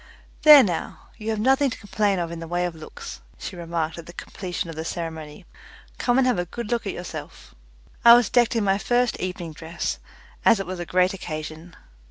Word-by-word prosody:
"There 300 -3 +10
now, 175 -5 -4
you 220 -1 -5
have 220 - 0
nothing 270 +4 +3
to - - -6
complain 205 -1 0
of 170 -1 -2
in 170 - -6
the 165 - -7
way 175 +1 0
of 175 - -3
looks," 155 -1 -9 0.2
she - - -7
remarked 170 -1 -3
at 165 - -10
the 170 - -10
completion 180 -1 -5
of 165 - -7
the 160 - -4
ceremony. 160 0 -6 0.5
"Come 245 0 +2
and 265 - +4
have 250 -7 +2
a 175 - -1
good 235 +5 -6
look 235 -3 -1
at - - -2
yourself." 175 - -8 0.5
I 235 0 +10
was 240 0 +4
decked 240 -2 +3
in 225 - +1
my 195 0 +2
first 245 +1 +1
evening 180 -3 -4
dress, 160 +2 -4 0.4
as 225 -3 +5
it 195 - -3
was 185 0 -6
a 175 - -5
great 185 +1 +2
occasion. 160 -1 -7
180 Hz, 215 wpm, -24 LUFS, 165-225 Hz, 0.5 s, There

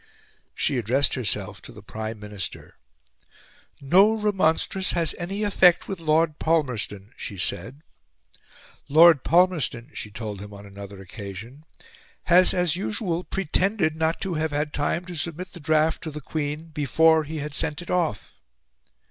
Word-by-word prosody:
She 135 - 0
addressed 130 +5 +1
herself 105 -5 -2
to - - -12
the 105 - -13
Prime 110 0 -6
Minister. 105 -2 -7 1.1
"No 190 +10 +5
remonstrance 190 -2 +1
has 170 -2 +1
any 195 +4 -2
effect 190 -4 +4
with 195 -3 -5
Lord 155 -1 +1
Palmerston," 125 -9 -1
she 100 - -6
said. 130 - -2 1.1
"Lord 160 -1 +7
Palmerston," 160 -7 +2
she 105 - -6
told 105 -2 -6
him 100 0 -9
on 100 0 -11
another 100 0 -10
occasion, 105 - -9 0.6
"has 180 +2 +5
as 180 -2 +1
usual 185 -2 -2
pretended 190 -2 0
not 160 +1 0
to 190 -2 -2
have 160 0 -1
had 150 +1 -2
time 170 +4 -1
to 180 - -8
submit 170 +3 -5
the - - -10
draft 155 +1 +1
to 160 - -5
the 150 0 -7
Queen 150 +2 -4
before 160 +2 +3
he 155 +2 -6
had 150 0 -5
sent 150 0 0
it - - -7
off." 170 - -2
155 Hz, 150 wpm, -24 LUFS, 115-175 Hz, 1.1 s, Lord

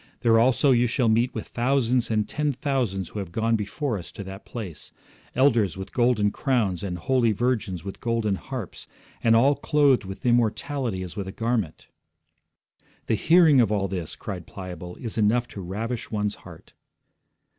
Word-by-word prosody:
There 115 -1 +5
also 130 +4 +4
you 120 -1 +4
shall 120 -1 +1
meet 115 +3 +2
with - - -5
thousands 125 -1 +1
and 110 -2 +1
ten 150 -1 -1
thousands 125 - -1
who 105 - -6
have 95 -4 -6
gone 115 +4 +1
before 110 +3 -2
us 85 - -10
to 100 - -7
that 95 +1 -9
place. 95 -10 -7 0.4
Elders 120 -9 +3
with 95 +1 -7
golden 120 -4 +2
crowns, 110 -11 0
and 90 -3 -4
holy 120 +4 +2
virgins 105 -6 -1
with 95 0 -7
golden 115 -3 0
harps, 115 0 -6 0.4
and 115 0 +5
all 135 +5 +5
clothed 145 -4 +3
with 95 +4 -8
immortality 120 -2 0
as 90 - -8
with 100 -2 -4
a - - -4
garment.' 115 -7 -2 1.2
'The - - 0
hearing 160 - +5
of 110 -3 +2
all 100 -2 +1
this,' 90 -4 -5
cried 90 -4 -7
Pliable, 90 -2 -8
'is 115 -2 -5
enough 115 +3 +2
to 100 - -7
ravish 110 +6 -4
one's 105 -1 -1
heart.' - - -14
115 Hz, 170 wpm, -25 LUFS, 95-125 Hz, 1.2 s, There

